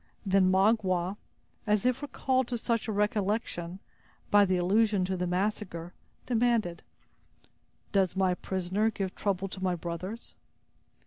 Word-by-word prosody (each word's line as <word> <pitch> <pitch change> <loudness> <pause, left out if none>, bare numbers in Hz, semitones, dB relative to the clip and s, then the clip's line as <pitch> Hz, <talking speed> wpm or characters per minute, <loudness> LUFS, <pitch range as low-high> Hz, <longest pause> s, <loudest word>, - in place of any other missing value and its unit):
Then 190 -1 +4
Magua, 190 -2 +2 0.5
as 210 0 +2
if 255 +2 +2
recalled 260 -3 0
to 245 - -2
such 230 -1 -1
a - - -1
recollection, 205 -3 -1 0.5
by 205 0 +7
the 185 -1 +1
allusion 200 +2 +2
to 190 +1 -1
the 180 0 -2
massacre, 180 -2 -2 0.3
demanded: 230 -7 +1 1.1
"Does 195 -3 +2
my 190 -1 +2
prisoner 190 +4 -1
give 195 -4 -3
trouble 195 -1 -1
to 190 0 -6
my 180 -1 +1
brothers?" 180 +6 -6
195 Hz, 130 wpm, -29 LUFS, 185-220 Hz, 1.1 s, by